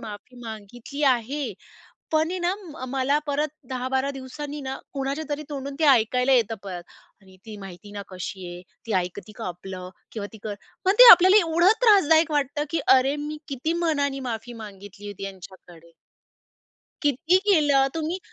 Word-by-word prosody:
माफी 215 Hz, +3 st, -10 dB
मागितली 225 Hz, +6 st, -8 dB
आहे, 260 Hz, -1 st, +1 dB, 0.6 s
पण 315 Hz, +1 st, +2 dB
आहे 370 Hz, -, -3 dB
ना 350 Hz, +1 st, 0 dB, 0.3 s
मला 270 Hz, +2 st, +1 dB
परत 295 Hz, +1 st, 0 dB, 0.2 s
10-12 260 Hz, +1 st, -1 dB
दिवसांनी 280 Hz, +2 st, -7 dB
ना 265 Hz, -1 st, -4 dB, 0.2 s
कुणाच्या 275 Hz, +3 st, -2 dB
तरी 295 Hz, 0 st, -3 dB
तोंडून 280 Hz, -1 st, -5 dB
ते 320 Hz, -, +1 dB
ऐकायला 250 Hz, +1 st, +3 dB
येतं 230 Hz, -4 st, +3 dB
परत 185 Hz, -3 st, -6 dB, 0.4 s
आणि 190 Hz, -1 st, -18 dB
"ती 215 Hz, -1 st, -8 dB
माहिती 195 Hz, 0 st, -11 dB
ना 205 Hz, -1 st, -6 dB
कशी 185 Hz, 0 st, -7 dB
आहे? 175 Hz, 0 st, -10 dB, 0.2 s
ती 225 Hz, -, -3 dB
ऐकते 185 Hz, +4 st, -4 dB
का 225 Hz, -, -6 dB
आपलं? 180 Hz, +1 st, -7 dB, 0.2 s
किंवा 210 Hz, -3 st, -4 dB
ती 220 Hz, -, -12 dB
कर" 210 Hz, -1 st, -4 dB, 0.3 s
पण 380 Hz, -, +4 dB
ते -, -, +12 dB
आपल्याला 370 Hz, +3 st, +8 dB
एवढं 340 Hz, +4 st, +4 dB
त्रासदायक 330 Hz, -8 st, +5 dB
वाटतं 290 Hz, 0 st, 0 dB
की 330 Hz, -, 0 dB
अरे! 265 Hz, +2 st, +5 dB
मी 300 Hz, +1 st, -5 dB
किती 280 Hz, +3 st, -2 dB
मनाने 285 Hz, -4 st, 0 dB
माफी 225 Hz, +2 st, -6 dB
मागितली 205 Hz, 0 st, -11 dB
होती 200 Hz, -1 st, -7 dB
यांच्याकडे. 180 Hz, -3 st, -12 dB, 1.1 s
किती 315 Hz, +5 st, +3 dB
केलं. 290 Hz, -6 st, +4 dB
तुम्ही 325 Hz, +3 st, -2 dB
265 Hz, 160 wpm, -24 LUFS, 205-295 Hz, 1.1 s, ते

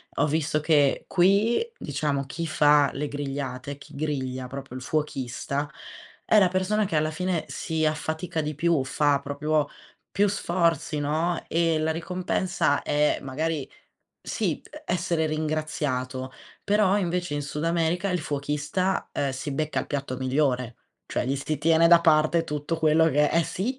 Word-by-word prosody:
ho -, -, +2 dB
visto 150 Hz, 0 st, 0 dB
che 150 Hz, -3 st, +3 dB
qui, 200 Hz, -, +3 dB, 0.2 s
diciamo 140 Hz, -2 st, -2 dB
chi 165 Hz, +4 st, -4 dB
fa 145 Hz, -1 st, +4 dB
le 145 Hz, +1 st, -3 dB
grigliate, 140 Hz, -1 st, -4 dB
chi -, -, -14 dB
griglia, 130 Hz, -4 st, -3 dB
proprio 135 Hz, -1 st, -7 dB
il -, -, -8 dB
fuochista, 140 Hz, 0 st, -2 dB, 0.5 s
è 215 Hz, -, +5 dB
la 190 Hz, -, +5 dB
persona 190 Hz, +3 st, +1 dB
che 165 Hz, -, -3 dB
alla 155 Hz, +1 st, +1 dB
fine 180 Hz, 0 st, -1 dB
si 160 Hz, -1 st, -2 dB
affatica 160 Hz, +2 st, -2 dB
di 150 Hz, -1 st, -2 dB
più, 165 Hz, -2 st, +2 dB
fa 145 Hz, 0 st, +2 dB
proprio 145 Hz, +1 st, 0 dB, 0.4 s
più 205 Hz, +1 st, +2 dB
sforzi, 170 Hz, -6 st, 0 dB
no. 160 Hz, +4 st, 0 dB
E 165 Hz, -1 st, +2 dB
la 160 Hz, +1 st, +1 dB
ricompensa 180 Hz, -2 st, 0 dB
è 150 Hz, 0 st, +1 dB
magari 145 Hz, +2 st, -2 dB, 0.5 s
sì, -, -, -2 dB, 0.2 s
essere 170 Hz, -2 st, 0 dB
ringraziato, 150 Hz, -4 st, -2 dB, 0.3 s
però 205 Hz, -1 st, +3 dB
invece 175 Hz, -3 st, -1 dB
in 145 Hz, -, -1 dB
Sud 150 Hz, +2 st, -4 dB
America 170 Hz, +3 st, +1 dB
il 180 Hz, -, 0 dB
fuochista, 150 Hz, +6 st, -1 dB
uhm, 140 Hz, -1 st, 0 dB
si 130 Hz, +3 st, -5 dB
becca 155 Hz, +2 st, -1 dB
il -, -, -6 dB
piatto 140 Hz, -3 st, -3 dB
migliore, 130 Hz, -2 st, 0 dB, 0.3 s
cioè -, -, -2 dB
gli 135 Hz, +2 st, 0 dB
si 155 Hz, +2 st, -2 dB
tiene 165 Hz, +3 st, +4 dB
da 170 Hz, -1 st, +8 dB
parte 160 Hz, 0 st, +3 dB
tutto 150 Hz, +2 st, -3 dB
quello 160 Hz, +1 st, +4 dB
che 150 Hz, +1 st, +3 dB
eh 170 Hz, -, +3 dB
sì, 250 Hz, +8 st, -3 dB
155 Hz, 155 wpm, -26 LUFS, 140-170 Hz, 0.5 s, da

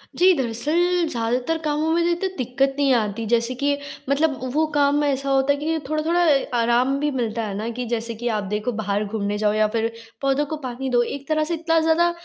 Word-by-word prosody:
जी, 370 Hz, +1 st, +5 dB
दरअसल 325 Hz, +9 st, +1 dB
ज़्यादातर 245 Hz, +5 st, -1 dB
कामों 300 Hz, +1 st, 0 dB
में 340 Hz, +1 st, +2 dB
तो -, -, +2 dB
इतनी 345 Hz, +3 st, -1 dB
दिक्कत 270 Hz, +2 st, 0 dB
नहीं 280 Hz, -1 st, +3 dB
आती 220 Hz, -1 st, 0 dB
जैसे 235 Hz, +2 st, +1 dB
कि 285 Hz, 0 st, +2 dB, 0.3 s
मतलब 285 Hz, 0 st, +1 dB
वो 310 Hz, +2 st, +3 dB
काम 290 Hz, 0 st, +3 dB
ऐसा 275 Hz, -1 st, 0 dB
होता 270 Hz, +1 st, +3 dB
है -, -, -3 dB
कि 295 Hz, -, -5 dB
जो 320 Hz, -, -1 dB
थोड़ा-थोड़ा 320 Hz, +3 st, +1 dB
अ, 285 Hz, -4 st, +4 dB
आराम 240 Hz, +4 st, +2 dB
भी 295 Hz, +1 st, 0 dB
मिलता 230 Hz, -3 st, -2 dB
है 210 Hz, -2 st, -4 dB
ना, 220 Hz, +3 st, -3 dB
कि 245 Hz, +1 st, -4 dB
जैसे 230 Hz, 0 st, -2 dB
कि 240 Hz, +2 st, -4 dB
आप 210 Hz, -1 st, -1 dB
देखो 210 Hz, +4 st, -1 dB
बाहर 210 Hz, -2 st, -1 dB
घूमने 205 Hz, -1 st, -2 dB
जाओ 210 Hz, 0 st, +1 dB
या 215 Hz, 0 st, +3 dB
फिर 225 Hz, 0 st, 0 dB, 0.3 s
पौधों 275 Hz, +1 st, +1 dB
को 310 Hz, +2 st, -4 dB
पानी 255 Hz, +2 st, -4 dB
दो, 245 Hz, -1 st, +3 dB
एक 275 Hz, +3 st, -6 dB
तरह 310 Hz, 0 st, +1 dB
से 325 Hz, +3 st, -2 dB
इतना 330 Hz, 0 st, +1 dB
ज़्यादा 325 Hz, +2 st, +3 dB
270 Hz, 225 wpm, -22 LUFS, 230-310 Hz, 0.3 s, जी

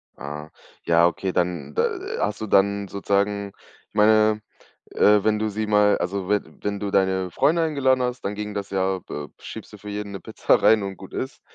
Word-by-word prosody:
Ah. 75 Hz, +2 st, -7 dB, 0.3 s
Ja 85 Hz, 0 st, +4 dB
okay, 95 Hz, +2 st, -2 dB
dann 85 Hz, -6 st, -2 dB
da -, -, +2 dB, 0.3 s
hast 105 Hz, +1 st, -1 dB
du 110 Hz, -, -3 dB
dann 100 Hz, 0 st, +2 dB
sozusagen 100 Hz, 0 st, -1 dB, 0.4 s
ich -, -, -45 dB
meine, 110 Hz, 0 st, +4 dB, 0.5 s
äh, 105 Hz, -1 st, +4 dB
wenn 110 Hz, 0 st, +2 dB
du 110 Hz, -, 0 dB
sie 110 Hz, +1 st, -3 dB
mal 105 Hz, -1 st, +4 dB
also 95 Hz, +1 st, -2 dB
we 105 Hz, 0 st, +3 dB, 0.2 s
wenn 100 Hz, -1 st, -2 dB
du 100 Hz, -, -3 dB
deine 95 Hz, -1 st, +1 dB
Freunde 165 Hz, -, +2 dB
eingeladen 130 Hz, -5 st, +2 dB
hast, 125 Hz, 0 st, -2 dB
dann 100 Hz, -, -2 dB
ging 105 Hz, 0 st, -5 dB
das 100 Hz, -1 st, -4 dB
ja 95 Hz, -1 st, 0 dB
be 75 Hz, -4 st, -7 dB
schiebst -, -, -9 dB
du -, -, -9 dB
für 105 Hz, -, -10 dB
jeden 105 Hz, 0 st, -5 dB
'ne 95 Hz, -, -5 dB
Pizza -, -, +1 dB
rein 110 Hz, -2 st, +5 dB
und 95 Hz, -1 st, -5 dB
gut 95 Hz, -, -12 dB
ist. 135 Hz, +3 st, -5 dB
100 Hz, 205 wpm, -23 LUFS, 95-105 Hz, 0.5 s, rein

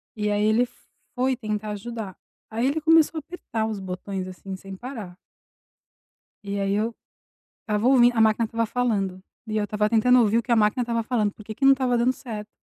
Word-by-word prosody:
E 210 Hz, -1 st, -1 dB
aí 205 Hz, 0 st, +1 dB
ele 230 Hz, +3 st, +3 dB, 0.5 s
foi 255 Hz, +1 st, +1 dB
tentar 215 Hz, -2 st, -4 dB
ajudar. 210 Hz, -2 st, -6 dB, 0.3 s
Aí 230 Hz, +3 st, -1 dB
ele 305 Hz, +3 st, 0 dB
começou 320 Hz, 0 st, +4 dB
a -, -, 0 dB
apertar 245 Hz, -9 st, -4 dB
os 215 Hz, -2 st, -3 dB
botões, 185 Hz, 0 st, -5 dB
assim, 190 Hz, +1 st, -7 dB
sem 195 Hz, 0 st, -9 dB
parar. 215 Hz, -6 st, -8 dB, 1.3 s
E 200 Hz, 0 st, -2 dB
aí 195 Hz, 0 st, 0 dB
eu 225 Hz, +2 st, -1 dB, 0.7 s
estava 210 Hz, +2 st, -1 dB
ouvindo, 245 Hz, -2 st, +5 dB
a -, -, +3 dB
máquina 220 Hz, +1 st, +4 dB
estava 230 Hz, +1 st, -1 dB
falando, 210 Hz, -6 st, -1 dB, 0.3 s
e 215 Hz, -, -2 dB
eu 210 Hz, -, +1 dB
estava 210 Hz, 0 st, 0 dB
tentando 250 Hz, +2 st, +5 dB
ouvir 225 Hz, 0 st, +3 dB
o -, -, 0 dB
que 245 Hz, -, -1 dB
a -, -, +5 dB
máquina 215 Hz, +3 st, +3 dB
estava 230 Hz, -1 st, -1 dB
falando, 220 Hz, -4 st, 0 dB
por 215 Hz, -, -14 dB
que 215 Hz, -, -6 dB
que 270 Hz, -, -3 dB
não 275 Hz, -, +8 dB
estava 255 Hz, -3 st, +1 dB
dando 250 Hz, +2 st, +3 dB
certo. 220 Hz, -5 st, -7 dB
220 Hz, 205 wpm, -24 LUFS, 205-245 Hz, 1.3 s, não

